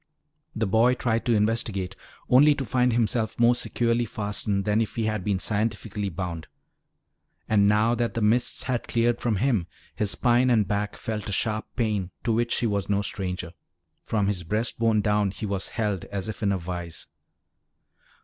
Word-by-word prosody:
The 110 - 0
boy 115 +5 +3
tried 115 -2 -1
to 120 - +4
investigate, 105 -3 0 0.3
only 145 +4 +6
to 140 -2 -3
find 125 +2 +2
himself 115 -1 0
more 120 +1 +6
securely 120 -1 0
fastened 105 -2 -2
than 105 +1 +2
if 110 - -3
he 115 - -1
had 110 -3 -1
been 100 -1 0
scientifically 105 0 -1
bound. 85 -2 -5 1.0
And 100 -2 +4
now 105 +3 +3
that 120 0 -1
the 115 - -1
mists 115 +4 +1
had 125 -2 -2
cleared 120 0 +1
from 115 -3 +1
him, 105 -5 +1 0.3
his 105 - -1
spine 120 +4 +3
and 110 -5 +3
back 105 0 -1
felt 105 -2 -4
a - - -3
sharp 110 +2 -1
pain 105 -6 0
to 120 - +1
which 120 +1 0
he - - +1
was 100 -3 -1
no 100 0 +1
stranger. 90 -4 -4 0.5
From 105 -3 0
his 100 -2 -1
breast 105 +8 -2
bone 115 -2 +3
down 105 -1 +2
he 100 - -6
was 100 -2 -2
held 105 -6 -2
as 100 -1 -5
if 110 - -6
in 100 -2 +2
a 100 - +1
vise. 85 -2 -6
105 Hz, 180 wpm, -26 LUFS, 100-115 Hz, 1.0 s, only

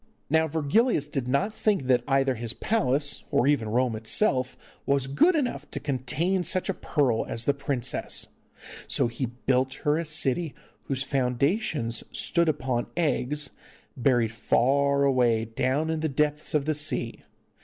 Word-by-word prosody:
Now 160 0 +3
Virgilius 160 - +1
did 135 -4 -3
not 165 +12 0
think 210 -8 0
that 125 -1 +3
either 135 -1 +2
his 115 -1 -5
palace, 145 - 0
or - - +2
even 140 -6 +1
Rome 120 +1 +1
itself, 130 - 0 0.3
was 140 -1 +2
good 145 - +3
enough 280 -6 -2
to - - -5
contain 150 +7 -1
such 185 +3 0
a - - +1
pearl 135 -10 0
as 115 - -4
the 140 - +3
princess, 140 -3 -1 0.6
so - - +2
he 120 +2 -3
built 130 +2 -1
her 150 +2 +3
a 170 - -3
city 155 0 0 0.3
whose 135 -1 -1
foundations 135 - 0
stood 170 -1 +2
upon 130 -5 -1
eggs, 150 -3 0 0.4
buried 120 -4 +2
far 140 +5 +2
away 120 -5 +2
down 130 +7 -1
in 160 - -1
the 160 0 -1
depths 150 +2 -1
of 145 -2 +1
the 155 - +1
sea. 150 +1 -1
140 Hz, 155 wpm, -26 LUFS, 125-155 Hz, 0.6 s, Now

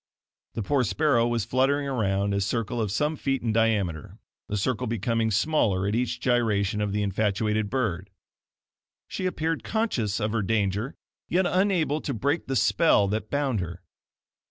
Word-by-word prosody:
The 115 - -2
poor 130 +6 +1
sparrow 115 +4 +2
was 120 -3 -1
fluttering 135 +4 +1
around 100 -6 0
a 100 - 0
circle 115 +3 -1
of 105 -3 -1
some 150 +9 0
few - - -18
feet 135 - -7
in 115 -2 0
diameter, 105 -8 0 0.3
the 105 - -1
circle 110 +2 -1
becoming 115 0 0
smaller 105 -5 +1
at 100 - -1
each 120 +1 -1
gyration 110 -4 +1
of 105 -1 -1
the 105 +1 0
infatuated 105 +1 0
bird. 100 -7 -2 1.0
She 185 - -3
appeared 165 -2 -2
conscious 125 - -1
of 105 0 -1
her 115 -1 0
danger, 105 +3 -1 0.3
yet 185 +2 +2
unable 175 -5 +1
to 140 - -3
break 145 +8 -1
the 135 - -1
spell 130 -7 +4
that 105 +1 -3
bound 140 -6 0
her. 85 0 -6
115 Hz, 165 wpm, -26 LUFS, 100-135 Hz, 1.0 s, spell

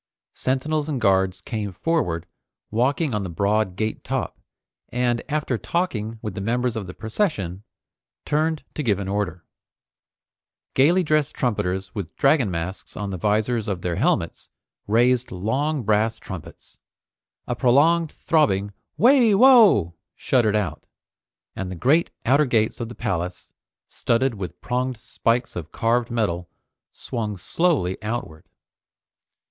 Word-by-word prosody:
Sentinels 150 +4 -1
and 140 -4 -1
guards 95 -3 +2
came 105 -4 -4
forward, 90 - -1 0.5
walking 135 +5 +1
on 105 - 0
the 95 - -4
broad 100 +2 0
gate 110 +2 -3
top, - - -3 0.5
and 120 -1 0
after 145 -6 -1
talking 115 - -2
with 105 - -4
the 95 - -5
members 120 +3 0
of 105 -4 -4
the 90 - -7
procession, 110 - -2 0.6
turned 155 +1 0
to - - -3
give 110 -8 +1
an 100 -1 -4
order. 95 -3 -2 1.3
Gaily 170 +8 +4
dressed 155 -2 +1
trumpeters 95 -6 -1
with 95 -4 -6
dragon 135 -6 +3
masks 90 +2 -5
on 100 -1 -3
the 95 - -3
visors 110 +3 +1
of 95 -4 -3
their 85 -2 -1
helmets - - 0 0.4
raised 120 +3 +3
long 130 +10 -1
brass 110 +2 +1
trumpets. 95 -6 -10 0.7
A - - -2
prolonged 155 +6 +3
throbbing 100 -11 +1 0.2
"Wai! 240 -3 +5
Wo!" 210 - +6 0.2
shuddered 110 -5 +2
out, 105 -3 -2 0.7
and 95 -1 -4
the 90 - -5
great 145 - +3 0.2
outer 140 +5 +4
gates 110 -4 +1
of 115 -1 -4
the 120 - -9
palace, 90 -5 -3 0.4
studded 125 +2 0
with 95 -5 -7
pronged 125 0 -1
spikes 115 +3 -1
of 85 -2 -6
carved 115 +1 +1
metal, 95 -7 -1 0.4
swung 105 -4 -4
slowly 115 - 0
outward. 105 -8 -5
115 Hz, 135 wpm, -23 LUFS, 95-140 Hz, 1.3 s, Wo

